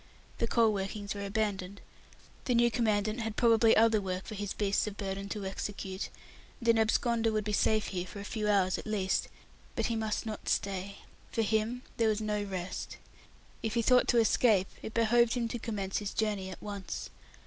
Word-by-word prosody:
The 230 - +1
coal 230 -2 +3
workings 200 +1 -3
were 200 -1 -5
abandoned; 200 -2 -2 0.7
the 250 - +2
new 235 0 +4
Commandant 215 -1 +1
had 225 -2 -3
probably 230 -1 +5
other 220 -1 +5
work 185 -1 -3
for - - -7
his 205 -1 -4
beasts 200 0 +1
of 205 -1 -6
burden 195 0 -4
to 205 -2 -4
execute, 190 0 -4 0.5
and 235 - -6
an 230 -1 +5
absconder 225 +1 +2
would 215 -1 0
be 210 0 -2
safe 215 +1 +2
here 180 -1 -3
for 200 - -8
a - - -6
few 210 -1 -2
hours 190 -3 +3
at - - -9
least. 195 -3 0 0.5
But - - 0
he 230 - 0
must 220 -1 -1
not 215 -2 -5
stay. 195 0 -2 0.3
For 225 - +1
him 220 +4 0
there 225 -1 +3
was 215 -1 +1
no 210 -1 -1
rest. 190 -3 -5 0.6
If 225 0 -2
he 235 - +2
thought 250 +2 +5
to 240 - +3
escape, 220 -4 +4
it 220 - -7
behoved 235 +1 +4
him 240 -2 0
to 240 - -4
commence 200 -4 -2
his 205 -1 -5
journey 205 -3 -1
at 185 - -9
once. 200 -2 -5
215 Hz, 195 wpm, -31 LUFS, 200-225 Hz, 0.7 s, probably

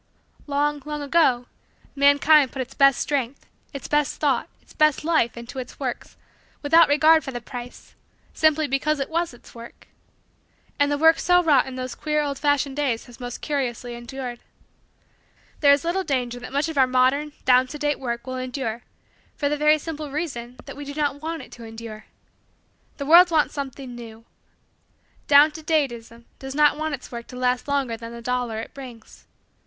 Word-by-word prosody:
Long, 290 0 0
long, 300 -1 -5
ago 280 -5 +2 0.5
mankind 285 0 +5
put 265 - -3
its 250 - -15
best 275 -2 +5
strength, 275 -2 -2 0.3
its 275 - -7
best 295 -2 0
thought, 275 -5 +1
its - - -21
best 305 -1 +2
life, 310 -8 +1
into 235 +2 -7
its 255 - -9
works, 255 -4 -5 0.5
without 325 +3 +5
regard 310 +2 +5
for - - -6
the 245 -2 -5
price, 245 0 -10 0.4
simply 315 0 +2
because 285 +2 0
it 275 +3 -3
was 335 +1 0
its 240 - -17
work. 235 0 -12 0.9
And 285 0 +3
the 290 - +1
work 320 +2 +5
so 355 0 +3
wrought 285 -6 +4
in 260 - -7
those 255 0 -5
queer 300 -1 -1
old 280 -2 -3
fashioned 285 -1 0
days 260 -6 -1
has 245 0 -15
most 245 -1 -7
curiously 245 -4 -3
endured. 240 +1 -7 1.2
There 285 -2 +6
is 285 +2 +3
little 365 +3 0
danger 250 -6 -2
that - - -9
much 285 +4 0
of 320 -3 -2
our 260 - +5
modern, 260 +4 +2
down 255 0 +5
to 295 - -8
date 295 0 -1
work 235 -2 -4
will 255 0 -5
endure 255 -3 -4 0.5
for 285 - -1
the 295 - 0
very 300 +1 +4
simple 305 -1 -6
reason 270 -5 -5
that - - -9
we 290 - -7
do 285 0 -8
not 285 -2 -1
want 325 +1 -4
it - - -15
to 235 - -11
endure. 225 -1 -9 0.9
"The 280 - -4
world 345 +4 +8
wants 315 -3 +2
something 270 -2 -6
new." 230 -1 -11 1.0
Down 290 +2 +7
to 315 +1 -9
date 305 -4 +1
ism 230 0 -12
does 270 0 -7
not 300 -1 +4
want 310 -1 -2
its 255 - -14
work 235 -1 -7
to 250 - -11
last 250 +1 0
longer 275 -5 0
than 230 0 -9
the 235 0 -10
dollar 245 -2 -2
it - - -10
brings. 245 -5 -12
275 Hz, 190 wpm, -23 LUFS, 245-300 Hz, 1.2 s, world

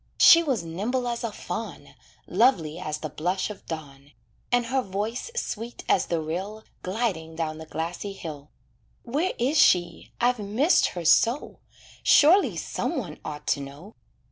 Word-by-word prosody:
She 335 - +9
was 265 - -1
nimble 215 +10 -2
as 240 0 -3
a 230 - -2
fawn, - - -6 0.3
Lovely 175 - +2
as 155 -4 -3
the 155 0 -5
blush 180 +7 -2
of 210 - -11
dawn, 145 -3 -8 0.4
And 245 -1 +3
her 260 +3 0
voice 210 - -4
sweet 235 - -4
as - - +2
the 170 - 0
rill 190 +8 -4 0.2
Gliding 185 -6 -2
down 160 -1 -3
the 160 - -9
grassy 170 +6 -4
hill. 150 -6 -8 0.5
Where 295 +10 -1
is 275 +6 +2
she, 175 -2 +3
I've 245 0 +2
missed 220 - +3
her 170 - -4
so, 235 - +3 0.4
Surely 345 +7 +5
some - - -3
one - - -5
ought 150 -1 -7
to - - +2
know. 140 +9 -10
195 Hz, 155 wpm, -26 LUFS, 160-240 Hz, 0.5 s, She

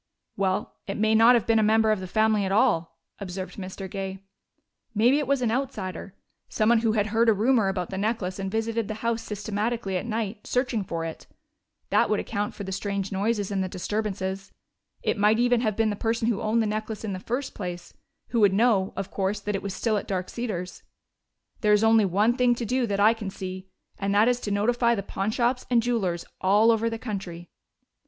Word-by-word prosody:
"Well, 190 -1 -1
it 195 - -3
may 220 +1 +2
not 225 +3 +7
have 235 - +1
been 225 -1 +3
a - - +4
member 220 +1 +4
of 215 - +1
the 185 - -6
family 215 +1 +2
at 190 - -2
all," 165 -5 +2 0.2
observed 185 -1 -6
Mr. 190 0 -6
Gay. 195 0 -5 0.7
"Maybe 245 +7 +4
it 290 - -2
was 275 -2 +1
an 225 - +1
outsider, 205 -7 -4 0.3
someone 225 +2 +3
who 225 -1 +1
had 210 -2 +2
heard 230 +1 +4
a - - +6
rumor 225 +1 +2
about 185 -2 -2
the 190 - -3
necklace 200 -3 -2
and 195 0 -2
visited 225 +1 -1
the 215 - -4
house 230 -1 0
systematically 210 -1 -2
at 180 - -4
night, 220 -2 -3
searching 250 -4 0
for 165 -3 -4
it. 160 - -7 0.6
That - - +3
would - - +2
account 205 - -3
for 205 - -6
those 190 -1 -3
strange 200 -1 -3
noises 205 +1 -1
and 195 -1 0
the 185 - -3
disturbances. 195 0 -3 0.5
It - - 0
might 210 +2 +4
even 245 0 +3
have 215 -4 0
been 225 -1 +2
the - - -2
person 225 +2 -1
who 230 -4 0
owned 225 +1 +1
the - - -1
necklace 215 0 -3
in 210 -3 -3
the 185 - -4
first 250 +7 -3
place, 175 -3 -6 0.4
who 235 - 0
would 205 -3 +5
know, 205 -3 +2
of 195 -1 -5
course, 195 +1 -1
that 210 +1 -3
it 195 - -2
was 195 -1 -5
still 220 -3 0
at - - -4
Dark 185 -2 -2
Cedars. 185 -7 -4 0.8
There 210 -1 +3
is 210 +1 +4
only 225 -1 +5
one 205 +6 +2
thing 250 -2 +3
to 235 - -4
do 250 +2 0
that 200 -1 -1
I 215 +2 +6
can 220 -4 -6
see, 185 0 -7 0.3
and 200 0 0
that 210 +3 +5
is 245 0 +2
to 215 - -4
notify 235 +4 +2
the 200 - -3
pawnshops 235 +6 -1
and 235 -2 +3
jewelers 195 -8 -1 0.2
all 205 +4 +5
over 230 0 +1
the 225 - -4
country." 190 -7 -6
210 Hz, 215 wpm, -26 LUFS, 195-230 Hz, 0.8 s, not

